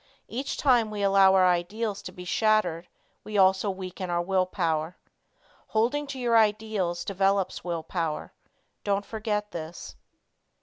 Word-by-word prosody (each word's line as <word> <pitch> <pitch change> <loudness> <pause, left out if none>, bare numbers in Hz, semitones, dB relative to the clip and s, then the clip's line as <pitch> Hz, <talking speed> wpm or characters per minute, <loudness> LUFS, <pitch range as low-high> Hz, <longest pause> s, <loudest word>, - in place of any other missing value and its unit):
Each 265 +4 -4
time 245 -6 +3
we 210 -1 -4
allow 195 -1 +5
our 185 -1 +5
ideals 200 +4 -1
to - - -8
be 180 - -10
shattered 180 -4 +1 0.4
we 210 -1 -4
also 190 +1 +4
weaken 185 -1 -5
our 175 0 0
will 185 0 +1
power. 160 -1 -1 0.7
Holding 250 +7 0
to 275 - -6
your 240 -2 +1
ideals 210 -5 0
develops 195 0 0
will 170 -2 -3
power. 160 -2 -3 0.5
Don't 200 0 0
forget 210 -1 -3
this. 165 0 -7
195 Hz, 140 wpm, -27 LUFS, 180-215 Hz, 0.7 s, allow